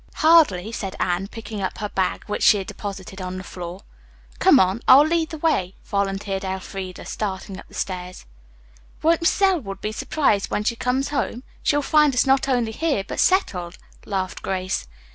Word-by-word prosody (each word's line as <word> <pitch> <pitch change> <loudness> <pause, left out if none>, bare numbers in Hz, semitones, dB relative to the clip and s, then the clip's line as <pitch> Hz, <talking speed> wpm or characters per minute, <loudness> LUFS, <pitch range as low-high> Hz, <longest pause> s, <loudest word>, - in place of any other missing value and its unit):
"Hardly," 295 - +4
said 195 -4 -5
Anne, 180 +1 0
picking 220 -1 -7
up 190 - -3
her 210 -1 -4
bag, 190 -2 -1
which 210 - -3
she 210 - +6
had 195 - -4
deposited 195 -1 -7
on 185 0 -5
the 185 - -6
floor. 180 +1 -8 0.6
"Come - - +6
on, 190 +4 +2
I'll 280 +3 +9
lead 325 0 +1
the 320 - -6
way," 245 - 0
volunteered 195 -1 -2
Elfreda, 190 -1 -5
starting 195 -2 -4
up - - -13
the - - -15
stairs. 180 - -5 0.8
"Won't 330 +1 +3
Mrs. 335 - +1
Elwood 280 - +1
be 215 - -3
surprised 215 -3 0
when 210 - -1
she 235 +2 0
comes 250 +3 -1
home? 260 -3 -2 0.2
She'll 290 0 +1
find 300 -2 +4
us 250 - +3
not 270 0 +2
only 240 -4 +1
here, 290 -4 0
but - - -5
settled," 180 - +1 0.3
laughed 190 -2 -3
Grace. 185 - -2
205 Hz, 180 wpm, -23 LUFS, 190-270 Hz, 0.8 s, I'll